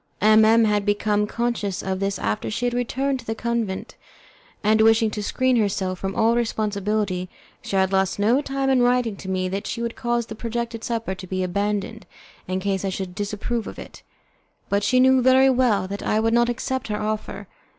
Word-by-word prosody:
M 215 Hz, +1 st, +6 dB
M 225 Hz, +1 st, +5 dB
had 210 Hz, -1 st, +1 dB
become 205 Hz, 0 st, +1 dB
conscious 215 Hz, -4 st, -2 dB
of 190 Hz, -1 st, -2 dB
this 195 Hz, 0 st, -1 dB
after 105 Hz, +2 st, -2 dB
she 175 Hz, -, -2 dB
had 245 Hz, -, 0 dB
returned 260 Hz, +3 st, -1 dB
to 235 Hz, -, -11 dB
the 225 Hz, -, -2 dB
convent, 230 Hz, -4 st, -3 dB, 0.7 s
and 215 Hz, +1 st, +4 dB
wishing 225 Hz, 0 st, +4 dB
to 210 Hz, -, -4 dB
screen 255 Hz, +4 st, +1 dB
herself 190 Hz, -4 st, -1 dB
from 195 Hz, +1 st, -4 dB
all 225 Hz, +1 st, +3 dB
responsibility 210 Hz, -4 st, -1 dB, 0.3 s
she -, -, -5 dB
had 190 Hz, 0 st, +2 dB
lost 190 Hz, -1 st, +1 dB
no 225 Hz, +7 st, +3 dB
time 275 Hz, -1 st, -2 dB
in 260 Hz, -2 st, +3 dB
writing 245 Hz, -3 st, +2 dB
to 190 Hz, -, -8 dB
me 185 Hz, -1 st, -1 dB
that 195 Hz, +2 st, -4 dB
she 230 Hz, -, -4 dB
would 235 Hz, 0 st, -3 dB
cause 240 Hz, -1 st, -1 dB
the 220 Hz, -, -8 dB
projected 230 Hz, 0 st, -4 dB
supper 230 Hz, -5 st, -2 dB
to 185 Hz, 0 st, -9 dB
be 185 Hz, 0 st, -2 dB
abandoned, 205 Hz, +2 st, -2 dB, 0.4 s
in 185 Hz, +1 st, -1 dB
case 195 Hz, 0 st, -1 dB
I 195 Hz, -, 0 dB
should 190 Hz, -1 st, -5 dB
disapprove 210 Hz, +3 st, -3 dB
of -, -, -8 dB
it, -, -, -11 dB, 0.7 s
but 200 Hz, 0 st, +1 dB
she 255 Hz, +4 st, +2 dB
knew 260 Hz, 0 st, +5 dB
very 260 Hz, +1 st, +5 dB
well 235 Hz, -7 st, +2 dB
that 200 Hz, +1 st, -5 dB
I 215 Hz, -, +1 dB
would 225 Hz, +1 st, +1 dB
not 240 Hz, 0 st, +3 dB
accept 260 Hz, +2 st, -3 dB
her 210 Hz, -1 st, -2 dB
offer. 215 Hz, 0 st, -4 dB
215 Hz, 200 wpm, -23 LUFS, 195-235 Hz, 0.7 s, M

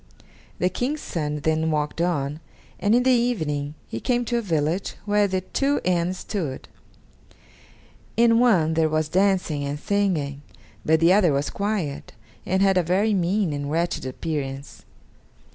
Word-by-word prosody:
The 180 Hz, -, +1 dB
King's 260 Hz, -, -2 dB
son 150 Hz, -3 st, -3 dB
then 160 Hz, +1 st, +1 dB
walked 150 Hz, +1 st, -1 dB
on, 150 Hz, -4 st, -1 dB, 0.4 s
and 205 Hz, +3 st, +3 dB
in 245 Hz, -, +3 dB
the 260 Hz, -, +4 dB
evening 155 Hz, -, 0 dB
he 115 Hz, -, -5 dB
came 245 Hz, -, 0 dB
to 240 Hz, +1 st, 0 dB
a -, -, -2 dB
village 165 Hz, -1 st, -1 dB
where 205 Hz, 0 st, +3 dB
the 185 Hz, -1 st, -1 dB
two 275 Hz, +9 st, 0 dB
inns 180 Hz, 0 st, 0 dB
stood: 160 Hz, -12 st, -4 dB, 1.5 s
in 230 Hz, 0 st, +5 dB
one 185 Hz, -11 st, +3 dB
there 160 Hz, -1 st, +2 dB
was 155 Hz, 0 st, 0 dB
dancing 185 Hz, -5 st, +1 dB
and 140 Hz, +1 st, -3 dB
singing, 165 Hz, -9 st, -1 dB, 0.4 s
but 160 Hz, +1 st, +2 dB
the 170 Hz, +2 st, +6 dB
other 190 Hz, -5 st, +4 dB
was 140 Hz, +1 st, -1 dB
quiet, 200 Hz, -9 st, -3 dB, 0.3 s
and 190 Hz, +2 st, +2 dB
had 195 Hz, -1 st, +3 dB
a -, -, +4 dB
very 190 Hz, +6 st, +1 dB
mean 185 Hz, -2 st, +1 dB
and 145 Hz, 0 st, -3 dB
wretched 170 Hz, +3 st, -1 dB
appearance. 135 Hz, 0 st, -5 dB
175 Hz, 155 wpm, -24 LUFS, 150-205 Hz, 1.5 s, the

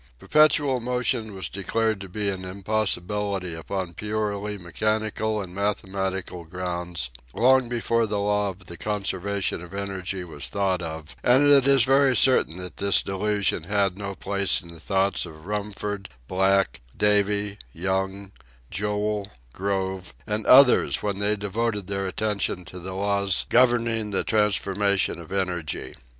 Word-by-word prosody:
Perpetual 145 Hz, -, +3 dB
motion 120 Hz, -3 st, -1 dB
was 95 Hz, -, -4 dB
declared 110 Hz, +2 st, -1 dB
to 95 Hz, -, -8 dB
be 105 Hz, +3 st, -2 dB
an 95 Hz, -1 st, -2 dB
impossibility 100 Hz, -1 st, -1 dB
upon 90 Hz, +2 st, -4 dB
purely 105 Hz, +1 st, -3 dB
mechanical 110 Hz, +4 st, -1 dB
and 95 Hz, -3 st, -6 dB
mathematical 95 Hz, -2 st, -2 dB
grounds 85 Hz, -5 st, -4 dB, 0.2 s
long 130 Hz, 0 st, +4 dB
before 115 Hz, -1 st, +1 dB
the 105 Hz, 0 st, -1 dB
law 105 Hz, 0 st, +1 dB
of 90 Hz, -1 st, -10 dB
the 85 Hz, 0 st, -9 dB
conservation 100 Hz, -1 st, -1 dB
of 90 Hz, +2 st, -10 dB
energy 95 Hz, -2 st, -3 dB
was 80 Hz, -5 st, -6 dB
thought 95 Hz, -3 st, 0 dB
of, 80 Hz, -2 st, -6 dB
and 130 Hz, +4 st, +5 dB
it 140 Hz, -2 st, +6 dB
is 135 Hz, -3 st, +6 dB
very 135 Hz, +1 st, +4 dB
certain 110 Hz, -7 st, +4 dB
that 90 Hz, 0 st, -7 dB
this 100 Hz, 0 st, +3 dB
delusion 100 Hz, -3 st, 0 dB
had 100 Hz, -1 st, +1 dB
no 100 Hz, -1 st, -5 dB
place 100 Hz, -9 st, 0 dB
in 85 Hz, -, -14 dB
the 85 Hz, -1 st, -11 dB
thoughts 95 Hz, -1 st, 0 dB
of 80 Hz, -1 st, -13 dB
Rumford, 105 Hz, -1 st, -4 dB, 0.2 s
Black, 95 Hz, +1 st, +2 dB, 0.2 s
Davy, 105 Hz, 0 st, +2 dB
Young, 95 Hz, +2 st, -2 dB, 0.4 s
Joule, 105 Hz, +1 st, -1 dB, 0.2 s
Grove, 95 Hz, -1 st, -3 dB
and 105 Hz, 0 st, -3 dB
others 130 Hz, 0 st, +6 dB
when 100 Hz, -1 st, -1 dB
they 105 Hz, +1 st, +2 dB
devoted 105 Hz, +1 st, -2 dB
their 100 Hz, 0 st, -2 dB
attention 100 Hz, -2 st, -1 dB
to 90 Hz, -, -9 dB
the 95 Hz, +1 st, -6 dB
laws 100 Hz, -1 st, +1 dB
governing 115 Hz, -3 st, +3 dB
the 95 Hz, -, 0 dB
transformation 100 Hz, -3 st, +1 dB
of 85 Hz, +1 st, -11 dB
energy. 90 Hz, -8 st, -2 dB
100 Hz, 140 wpm, -25 LUFS, 95-105 Hz, 0.4 s, it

